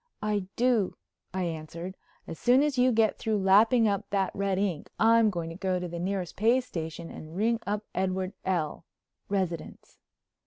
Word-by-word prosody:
"I 205 -3 0
do," 235 -6 +2 0.4
I 185 0 -2
answered. 170 +2 -5 0.3
"As 165 - -8
soon 250 +3 +5
as 295 -2 0
you 255 0 +4
get 225 -2 +2
through 220 -1 0
lapping 215 +4 +5
up 200 -2 -1
that 195 -2 0
red 195 -1 0
ink 185 -6 -1
I'm 225 0 +5
going 170 -4 -4
to - - -8
go 185 0 -1
to 180 - -4
the 170 0 -6
nearest 185 -1 -2
pay 230 +5 +4
station 165 -7 -6
and 155 +1 -10
ring 225 +3 +2
up 210 +1 -1
Edward 185 0 -1
L., 170 -5 -1 0.5
residence." 185 -4 -3
195 Hz, 170 wpm, -28 LUFS, 175-220 Hz, 0.5 s, soon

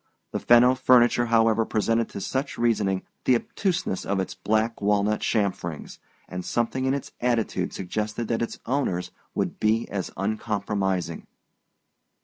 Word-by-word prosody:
The - - -2
Fenno 120 +1 +6
furniture, 120 -2 +4
however, 115 -1 +4
presented 115 +1 0
to 100 - -7
such 130 +7 -2
reasoning 105 -5 +1 0.2
the 130 - +5
obtuseness 175 - -1
of 100 0 -1
its 95 - -2
black 110 +4 0
walnut 105 +1 +2
chamferings; 95 -7 -2 0.3
and 90 0 -5
something 120 +5 -1
in 135 +1 +2
its 140 - -6
attitude 120 -3 0
suggested 105 +4 -3
that 115 - 0
its 115 - -3
owners 115 -9 -1 0.2
would - - -2
be 110 +1 +2
as 95 -3 -3
uncompromising. 100 -4 -2
110 Hz, 135 wpm, -25 LUFS, 100-120 Hz, 0.3 s, Fenno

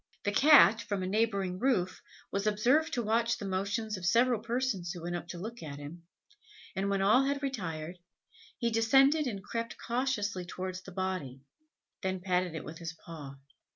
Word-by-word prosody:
The 205 - +1
Cat, 265 -3 +7
from 200 -3 -3
a - - -1
neighbouring 195 -2 0
roof, 190 -8 +1 0.3
was 200 +1 -1
observed 250 +10 +3
to 240 - 0
watch 230 +2 +1
the 205 - -6
motions 200 +3 -2
of 185 - -9
several 235 +4 +4
persons 235 -7 -1
who 175 -2 -8
went 175 +1 -3
up 175 -1 -5
to 175 - -7
look 225 +7 -7
at 145 -3 -7
him, 165 +4 -10 0.7
and 195 +1 0
when 195 -1 +1
all 220 +7 +5
had 280 +1 -1
retired, 175 - -4 0.6
he 235 -2 0
descended 270 +7 +4
and 200 -5 -4
crept 230 +3 -4
cautiously 235 -6 -1
towards 185 +1 -5
the 195 - -11
body, 180 -9 -3 0.6
then 190 0 -1
patted 180 -2 0
it 160 - -5
with 160 +1 -8
his 165 -1 -5
paw. 155 -4 -10
200 Hz, 180 wpm, -31 LUFS, 180-235 Hz, 0.7 s, Cat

